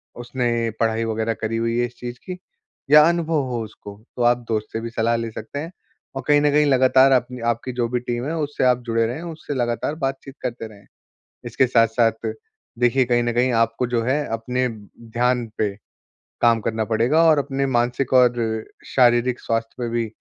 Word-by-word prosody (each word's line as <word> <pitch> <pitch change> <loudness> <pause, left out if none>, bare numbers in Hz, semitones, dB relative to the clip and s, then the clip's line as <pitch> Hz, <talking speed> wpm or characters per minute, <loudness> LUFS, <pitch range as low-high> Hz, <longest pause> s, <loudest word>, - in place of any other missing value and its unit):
उसने 120 -1 -1
पढ़ाई 115 0 +1
वगैरह 110 0 -1
करी 115 +1 -1
हुई 115 0 -1
है 120 - +2
इस 120 - -19
चीज़ 120 0 -6
की 185 -1 -6 0.5
या 150 0 +9
अनुभव 165 -3 0
हो 120 -2 -2
उसको, 105 -1 -11 0.2
तो - - -2
आप 120 0 +4
दोस्त 110 -1 -1
से 110 - -2
भी 115 - -5
सलाह 115 0 +1
ले 115 0 -3
सकते 110 +6 -7
हैं। 165 +4 -6 0.4
और 135 - -3
कहीं 145 -1 +5
न 145 0 +3
कहीं 150 +1 +4
लगातार 130 0 +5
अपनी 125 0 0
आपकी 120 +2 -5
जो 120 -1 -1
भी 125 0 -1
टीम 120 0 -4
है, 160 +3 -2
उससे 145 -3 -2
आप 125 -1 +3
जुड़े 115 0 +1
रहें, 125 +7 -5
उससे 160 -3 -6
लगातार 120 +4 -1
बातचीत 135 -2 -4
करते 120 -2 -4
रहें। 100 -2 -16 0.6
इसके 120 +2 +1
साथ-साथ 115 -1 +3 0.7
देखिए, 125 +2 +3
कहीं 120 -1 +2
न 120 0 -1
कहीं 125 +2 +2
आपको 115 +2 +1
जो 120 -1 0
है 140 +5 0
अपने 125 +3 -1
ब 105 -3 -11 0.2
ध्यान 125 0 +1
पे 100 -2 -1 0.7
काम 115 -1 +4
करना 110 0 -2
पड़ेगा 115 +9 +2
और 155 -2 +5
अपने 135 -1 -1
मानसिक 120 +1 0
और 125 -1 +5 0.5
शारीरिक 120 -1 +3
स्वास्थ्य 115 0 -2
पे 120 -1 -2
भी 115 0 -1
120 Hz, 195 wpm, -22 LUFS, 115-130 Hz, 0.7 s, या